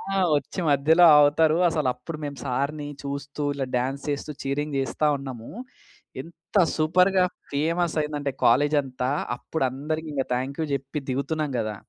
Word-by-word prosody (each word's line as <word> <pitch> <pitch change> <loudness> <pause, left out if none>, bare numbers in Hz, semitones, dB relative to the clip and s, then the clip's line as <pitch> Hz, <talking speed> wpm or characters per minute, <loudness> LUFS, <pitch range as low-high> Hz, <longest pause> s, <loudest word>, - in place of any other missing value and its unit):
ఆ! 195 - +2 0.2
వచ్చి 145 +6 -5
మధ్యలో 155 +5 +4
ఆగుతారు. 155 +2 +5
అసలు 155 -5 -1
అప్పుడు 165 +4 -8
మేము 145 -1 -5
సార్‌ని 140 +3 -2 0.2
చూస్తూ 140 +1 -5
ఇలా 140 -1 -3
డాన్స్ 130 +3 -2
చేస్తూ 145 +1 -3
చీరింగ్ 145 +2 -2
చేస్తా 145 +3 0
ఉన్నాము. 130 -4 -8 0.7
ఎంత 170 +6 -18 0.2
సూపర్‌గా 180 +4 +3 0.3
ఫేమస్ 165 +4 0
అయిందంటే 145 -2 -3
కాలేజంతా 135 0 +2 0.3
అప్పుడు 160 +3 -4
అందరికి 155 +4 -4
ఇంక 135 -2 0
థాంక్ 130 +4 -3
యూ - - 0
చెప్పి 140 +2 -3
దిగుతున్నాం 150 +3 -2
కదా! 110 -1 -2
145 Hz, 140 wpm, -25 LUFS, 135-155 Hz, 0.7 s, ఆగుతారు